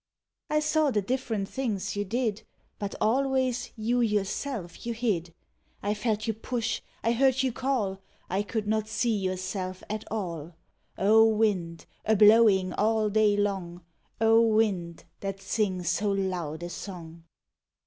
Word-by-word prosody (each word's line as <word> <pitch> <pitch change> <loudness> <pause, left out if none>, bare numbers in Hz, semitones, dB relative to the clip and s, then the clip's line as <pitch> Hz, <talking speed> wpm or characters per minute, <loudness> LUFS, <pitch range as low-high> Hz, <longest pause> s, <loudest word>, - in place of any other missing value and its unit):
I 305 0 +2
saw 305 0 +2
the 210 -6 0
different 225 -3 -2
things 205 -6 -3
you 205 - 0
did, 225 0 -1 0.4
Hut 200 -2 -4
alwavs 260 +1 +1
you 235 +2 0
yourself 210 -2 -1
vou 235 - -4
hid. 205 -8 -1 0.5
1 205 +1 0
felt 215 0 -1
you 225 - 0
push, 225 +1 -2 0.2
I 230 - +2
heard 260 +2 +3
you 260 - +1
call, 230 -8 -1 0.3
I 190 +3 0
could 210 +1 -3
not 215 0 0
see 220 +1 0
yourself 185 -1 -3
at 215 0 -3
all 170 -6 -4 0.2
— - - -40
O 220 0 +7
wiud, 190 -7 0 0.2
a 220 - +3
blowing 210 -3 +6
all 215 0 +1
day 210 -1 +3
long, 190 -4 -2 0.4
O 225 0 +5
wind, 210 -7 +1 0.2
that 195 0 -4
sings 190 -3 -1
so 205 +4 +1
loud 180 -5 -2
a 175 - -4
song! 170 -4 -8
210 Hz, 150 wpm, -28 LUFS, 190-230 Hz, 0.5 s, O